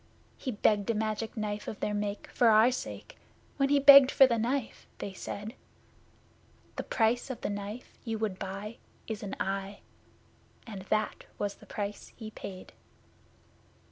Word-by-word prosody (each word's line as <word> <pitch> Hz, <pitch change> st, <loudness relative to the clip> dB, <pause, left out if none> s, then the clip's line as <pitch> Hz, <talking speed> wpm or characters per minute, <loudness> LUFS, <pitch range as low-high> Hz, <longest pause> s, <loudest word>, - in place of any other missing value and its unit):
He 265 Hz, -, -5 dB
begged 210 Hz, -2 st, +2 dB
a 230 Hz, -, +2 dB
Magic 220 Hz, +2 st, -2 dB
Knife 210 Hz, -1 st, -3 dB
of 210 Hz, -, -5 dB
their 210 Hz, -, -1 dB
make 205 Hz, 0 st, -3 dB
for 240 Hz, -, +3 dB
our 220 Hz, +2 st, +6 dB
sake. 255 Hz, -, -6 dB, 0.4 s
When 275 Hz, -1 st, +2 dB
he 285 Hz, -, +5 dB
begged 280 Hz, -1 st, +10 dB
for 270 Hz, -, +7 dB
the 235 Hz, -3 st, +1 dB
Knife 245 Hz, +1 st, -2 dB
they 195 Hz, -, -5 dB
said: 205 Hz, +3 st, -6 dB, 1.2 s
'The -, -, -3 dB
price 230 Hz, +2 st, +1 dB
of 260 Hz, -, -5 dB
the 205 Hz, -, -2 dB
Knife 205 Hz, +4 st, -7 dB
you 225 Hz, -2 st, -2 dB
would 210 Hz, -4 st, -2 dB
buy 200 Hz, +4 st, -6 dB, 0.3 s
is 220 Hz, -2 st, -5 dB
an 200 Hz, -, -5 dB
eye!' 195 Hz, +1 st, -3 dB, 0.8 s
And 210 Hz, -5 st, -7 dB
that 215 Hz, 0 st, 0 dB
was 205 Hz, -1 st, -2 dB
the -, -, -18 dB
price 205 Hz, 0 st, -5 dB
he 220 Hz, -2 st, -8 dB
paid. 185 Hz, -3 st, -9 dB
215 Hz, 160 wpm, -30 LUFS, 205-235 Hz, 1.2 s, begged